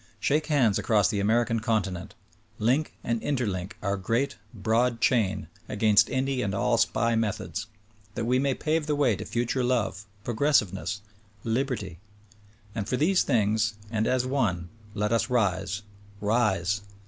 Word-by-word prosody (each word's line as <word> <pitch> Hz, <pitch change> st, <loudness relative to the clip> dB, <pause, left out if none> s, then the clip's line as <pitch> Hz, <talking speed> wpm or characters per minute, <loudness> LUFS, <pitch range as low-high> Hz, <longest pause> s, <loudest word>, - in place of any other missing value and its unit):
Shake 150 Hz, +6 st, +1 dB
hands 125 Hz, -10 st, +3 dB
across 105 Hz, -3 st, +3 dB
the 105 Hz, -2 st, -1 dB
American 115 Hz, +3 st, +2 dB
continent; 100 Hz, -6 st, -2 dB, 0.4 s
link 130 Hz, +8 st, +1 dB
and 115 Hz, -1 st, -1 dB
interlink 105 Hz, -9 st, -2 dB
our 100 Hz, 0 st, 0 dB
great, 120 Hz, +9 st, 0 dB, 0.2 s
broad 115 Hz, +2 st, +1 dB
chain 100 Hz, -8 st, +1 dB, 0.2 s
against 105 Hz, -1 st, +4 dB
any 130 Hz, 0 st, 0 dB
and 100 Hz, -2 st, -1 dB
all 120 Hz, +2 st, +2 dB
SPY 115 Hz, 0 st, +2 dB
methods; 110 Hz, 0 st, -2 dB, 0.5 s
that 115 Hz, -, -2 dB
we 125 Hz, +2 st, +2 dB
may 135 Hz, -1 st, +1 dB
pave 155 Hz, 0 st, 0 dB
the 150 Hz, -, +1 dB
way 135 Hz, -7 st, +3 dB
to -, -, -6 dB
future 120 Hz, +2 st, -1 dB
love, 110 Hz, -5 st, 0 dB, 0.2 s
progressiveness 105 Hz, -, +1 dB, 0.2 s
— 100 Hz, 0 st, -31 dB, 0.2 s
liberty; 120 Hz, -, -3 dB, 0.7 s
and 105 Hz, -2 st, -4 dB
for 125 Hz, -, +1 dB
these 180 Hz, +6 st, +3 dB
things 110 Hz, -2 st, +1 dB, 0.2 s
and 110 Hz, -1 st, 0 dB
as 130 Hz, -1 st, +1 dB
one, 105 Hz, -11 st, 0 dB, 0.3 s
let 105 Hz, +1 st, 0 dB
us 115 Hz, +1 st, +1 dB
rise; 105 Hz, -3 st, 0 dB, 0.4 s
rise 100 Hz, -3 st, +1 dB
115 Hz, 150 wpm, -27 LUFS, 100-125 Hz, 0.7 s, against